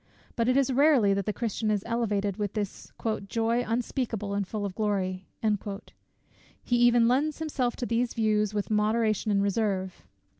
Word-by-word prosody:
But 230 +1 +1
it 255 - +3
is 270 -1 +2
rarely 265 -7 +5
that 195 -1 -2
the - - +2
Christian 220 0 -2
is 205 -2 0
elevated 210 -4 -1
with 205 -2 -2
this 205 -3 -5 0.4
"joy 230 +3 0
unspeakable 225 -3 -2
and 200 -1 -1
full 210 0 -3
of 195 - -4
glory:" 190 -3 -2 1.4
he 245 - 0
even 240 -1 +5
lends 280 +5 +1
himself 285 -6 -1
to 245 - -3
these 235 +1 0
views 215 -2 +1
with 210 0 -3
moderation 215 0 +1
and 200 -1 +2
reserve. 195 -2 -1
220 Hz, 160 wpm, -28 LUFS, 205-240 Hz, 1.4 s, rarely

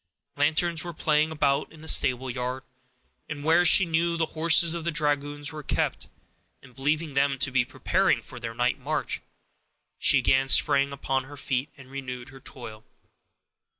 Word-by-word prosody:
Lanterns 160 +3 +2
were 175 -2 -7
playing 155 0 +1
about 140 -3 0
in 160 -1 -15
the 160 - -11
stable 130 -3 +3
yard, 125 +1 -4 0.6
where 155 +3 +1
she 190 +2 +6
knew 170 +1 0
the 165 - +1
horses 165 +1 +4
of 170 -1 -5
the 170 - -2
dragoons 145 -1 -1
were 155 -1 -8
kept, - - -3 0.5
and 125 -2 -17
believing 150 +4 -2
them 140 0 +1
to 135 +1 +1
be 125 -1 +2
preparing - - 0
for - - -12
their 115 -1 -7
night 125 +3 0
march, 150 +3 -3 0.8
she - - +5
again 135 0 +2
sprang 140 0 +4
upon 135 -1 -3
her 145 +1 -12
feet, 135 +1 -3
and 130 -1 -15
renewed 130 -2 -7
her 135 0 -14
toil. 110 -5 -10
145 Hz, 165 wpm, -25 LUFS, 130-160 Hz, 0.8 s, she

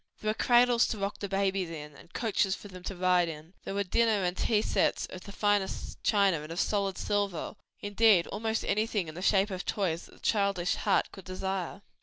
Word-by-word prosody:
There 215 - 0
were - - -1
cradles 240 +1 +4
to 220 - -3
rock 200 0 -3
the 200 - -4
babies 195 -2 0
in, 150 -3 -8
and 170 - -16
coaches 205 -4 0
for 205 - -11
them 185 -1 -10
to 195 - -4
ride 180 -1 +3
in; 160 +2 -9
there 195 - -4
were 200 - +1
dinner 215 +1 +2
and 180 0 0
tea 215 +2 +1
sets - - +1
of 185 - -10
the 200 - -8
finest 205 -1 -1
china 200 -7 +3
and 155 +2 -8
of 170 - -4
solid 200 -2 0
silver; 205 -3 -1 0.3
indeed 205 -3 +4
almost 220 +1 -2
everything 210 -3 0
in - - -8
the 175 - -7
shape 195 +1 +3
of 185 -1 -4
toys 175 -5 -2
that - - -18
the - - -18
childish 200 -4 +1
heart - - +1
could 195 - -12
desire. 190 0 -4
195 Hz, 215 wpm, -30 LUFS, 180-205 Hz, 0.3 s, cradles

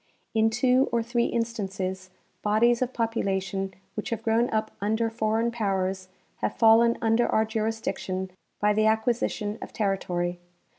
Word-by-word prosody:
In 220 0 +3
two 250 +3 +3
or 235 -1 +1
three 235 +1 0
instances 195 -5 -3 0.3
bodies 230 +3 +3
of 255 0 0
population 195 -5 -2 0.2
which 215 - -4
have 225 -1 -3
grown 230 +2 +2
up 220 0 -1
under 220 +2 0
foreign 225 +1 0
powers 190 -4 -1 0.3
have - - -2
fallen 230 +1 +5
under 225 +1 +3
our 220 - +2
jurisdiction 215 -4 -3 0.3
by 210 0 +3
the 215 +1 +2
acquisi 220 +2 +2
tion 210 0 -4
of - - -7
territory. 180 -4 -1
220 Hz, 145 wpm, -26 LUFS, 195-230 Hz, 0.3 s, fallen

